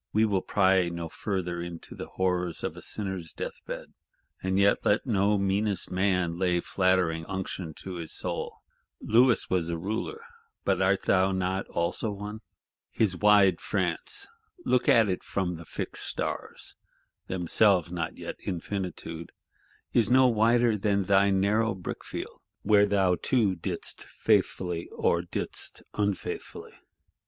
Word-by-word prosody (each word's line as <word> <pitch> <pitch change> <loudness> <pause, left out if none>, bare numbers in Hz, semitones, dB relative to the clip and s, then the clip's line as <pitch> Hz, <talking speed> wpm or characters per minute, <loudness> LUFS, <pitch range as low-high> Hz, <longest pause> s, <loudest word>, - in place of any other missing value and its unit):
—We 110 +1 +4
will 100 -3 +1
pry 95 -3 +3
no 85 -1 -5
further 90 -3 -3
into 85 -1 -7
the - - -7
horrors 90 -2 -1
of - - -3
a - - -10
sinner's 95 -5 -3
death - - -6
bed. - - -7 0.5
And 95 0 0
yet 100 +1 +3
let 105 - +2
no 105 -3 +2
meanest 100 +1 0
man 90 -2 +1
lay 90 -2 +2
flattering 95 -3 +1
unction 95 -3 -5
to 95 -2 -6
his 85 -2 -6
soul. - - -4 0.4
Louis 120 +2 +4
was 90 -3 0
a 85 - -2
Ruler; 110 - -4 0.4
but - - +2
art 95 +1 +2
not 95 0 +3
thou 95 +1 0
also 85 +6 -1
one? 105 +2 -6 0.5
His 105 -5 +1
wide 100 -2 +5
France, 95 - -1 0.4
look 125 -1 +2
at 115 -2 +6
it 90 -2 -2
from 90 -3 -2
the 85 - -10
Fixed - - -4
Stars - - -4 0.5
(themselves 90 0 +2
not 85 -2 -3
yet - - -6
Infinitude), 90 -3 -4 0.6
is 115 -3 +3
no 130 +1 +6
wider 115 -1 +3
than 100 -1 +1
thy 100 +1 +4
narrow 100 +3 +2
brickfield, 90 - -7 0.2
where 105 0 +5
thou 95 -3 +2
too 115 -7 +2
didst 85 - -3
faithfully, 90 -2 0
or 85 - +1
didst 85 - -2
unfaithfully. 100 -2 -3
95 Hz, 140 wpm, -28 LUFS, 90-105 Hz, 0.6 s, at